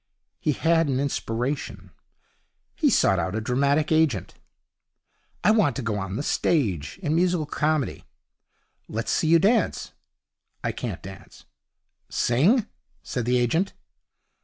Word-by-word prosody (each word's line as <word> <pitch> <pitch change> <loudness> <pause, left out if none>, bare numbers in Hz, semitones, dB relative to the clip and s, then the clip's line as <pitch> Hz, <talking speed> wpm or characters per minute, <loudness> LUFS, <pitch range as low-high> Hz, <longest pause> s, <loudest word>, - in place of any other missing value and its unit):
He 150 - 0
had 165 +2 +2
an 130 -1 0
inspiration. 120 -7 -3 0.8
He - - +2
sought 95 - +3
out 90 +4 -2
a - - 0
dramatic 140 +7 +1
agent. 155 - +1 1.1
'I 210 - +5
want 210 - +3
to 135 - -4
go 105 -2 -1
on 95 0 -4
the 140 - -2
stage, 100 - 0
in 150 -2 0
musical 175 -1 +1
comedy.' 150 -1 -1 0.8
'Let's 110 +1 -3
see 160 - +1
you 165 +1 +6
dance.' 205 +3 +1 0.7
'I - - 0
can't - - -6
dance.' 95 0 -12 0.6
'Sing,' 185 - +2 0.4
said 125 -3 -3
the 125 +1 +2
agent. 160 +11 +1
140 Hz, 130 wpm, -25 LUFS, 115-165 Hz, 1.1 s, you